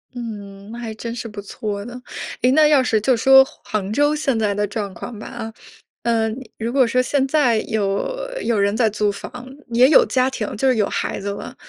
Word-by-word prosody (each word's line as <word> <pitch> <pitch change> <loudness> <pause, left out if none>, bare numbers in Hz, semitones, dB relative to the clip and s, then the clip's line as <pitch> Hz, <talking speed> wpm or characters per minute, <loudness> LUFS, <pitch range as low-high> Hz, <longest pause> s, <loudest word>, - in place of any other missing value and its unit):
嗯， 205 -4 -8
那 235 - -7
还 225 -2 -5
真 230 +1 -5
是 240 -1 -5
不 210 -2 -8
错 205 0 -5
的。 245 +1 -8 0.4
哎， 250 - +4
那 305 +2 +5
要 290 -3 +5
是 225 -3 +2
就 245 +5 +2
说 265 +3 +7 0.2
杭 205 -2 -3
州 290 +4 +3
现 275 -5 0
在 210 -2 0
的 205 0 +1
状 205 -1 -4
况 215 +5 -8
吧 - - -8
啊， 225 -2 -7 0.5
呃， 230 -1 +1 0.3
如 230 +2 -3
果 265 -3 +4
说 250 +3 +1
现 265 +2 +1
在 265 -6 +3
有 215 - -1 0.2
有 230 -3 0
人 200 +1 +2
在 225 -1 +3
租 210 0 0
房， 245 +5 -9 0.3
也 245 +2 +6
有 305 - +7
家 255 0 +1
庭 235 -6 -4
就 265 - +1
是 255 -2 +3
有 210 -2 +2
孩 - - -2
子 200 - -4
了， 200 - -6
230 Hz, 230 characters per minute, -21 LUFS, 210-255 Hz, 0.5 s, 说